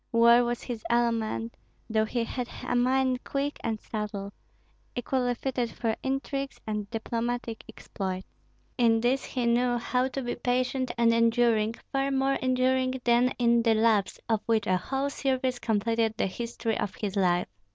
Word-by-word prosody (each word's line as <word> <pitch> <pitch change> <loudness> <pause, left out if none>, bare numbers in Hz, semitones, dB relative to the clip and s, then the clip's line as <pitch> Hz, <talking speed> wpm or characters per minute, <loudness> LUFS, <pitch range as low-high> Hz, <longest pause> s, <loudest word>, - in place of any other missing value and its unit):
War 235 +1 +6
was 240 0 -2
his 235 -3 -5
element, 230 -1 0 0.3
though 220 -1 +2
he 235 +2 -1
had 245 +1 -4 0.2
a - - 0
mind 255 +1 +2
quick 285 +1 -2
and 220 -1 -1
subtle, 205 -2 -5 0.6
equally 245 0 0
fitted 245 -1 -2
for 225 -1 -2
intrigues 270 +1 -3
and 210 -2 -3
diplomatic 230 0 -3
exploits. 190 -1 -5 0.5
In 230 -2 +4
these 250 +3 +1
he 250 -2 -2
knew 240 +1 +2
how 250 +2 0
to 265 0 -4
be 240 - -2
patient 255 +1 0
and 230 -1 +4
enduring, 230 -1 +3 0.2
far 275 0 +1
more 270 0 +2
enduring 255 0 +1
than 240 +1 +4
in 235 -1 +4
the 230 -1 +3
"loves," 215 -3 +2
of 220 -3 +1
which 220 -2 +2
a 185 - +2
whole 270 +9 -2
series 260 -3 -1
completed 225 0 0
the - - +1
history 230 +2 -3
of 195 - -3
his 205 -2 -4
life. 180 -3 +2
235 Hz, 160 wpm, -28 LUFS, 225-255 Hz, 0.6 s, War